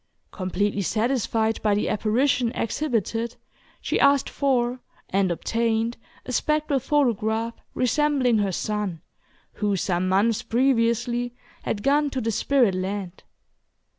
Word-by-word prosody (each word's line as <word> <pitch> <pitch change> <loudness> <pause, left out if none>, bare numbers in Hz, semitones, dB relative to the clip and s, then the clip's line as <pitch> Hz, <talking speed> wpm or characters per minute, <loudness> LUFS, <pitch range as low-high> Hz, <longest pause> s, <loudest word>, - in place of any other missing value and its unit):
Completely 200 +2 -1
satisfied 225 +1 0
by 210 -1 +2
the 205 - 0
apparition 240 +3 +1
exhibited, 230 -2 -1 0.5
she - - -1
asked 280 -1 +4
for 255 -3 0 0.3
and 190 -1 +1
obtained 230 +5 0 0.3
a 255 - -5
spectral 300 +1 +1
photograph 230 -5 0 0.2
resembling 255 -2 +2
her 200 -2 +1
son, 200 -3 -3 0.5
who, 205 -1 +1
some 185 0 0
months 205 +4 +2
previously, 240 0 +1 0.3
had 205 - -3
gone 290 +2 +3
to 270 - -3
the 225 -2 -1
spirit 245 -2 +2
land. 190 0 -4
230 Hz, 115 wpm, -24 LUFS, 205-255 Hz, 0.5 s, asked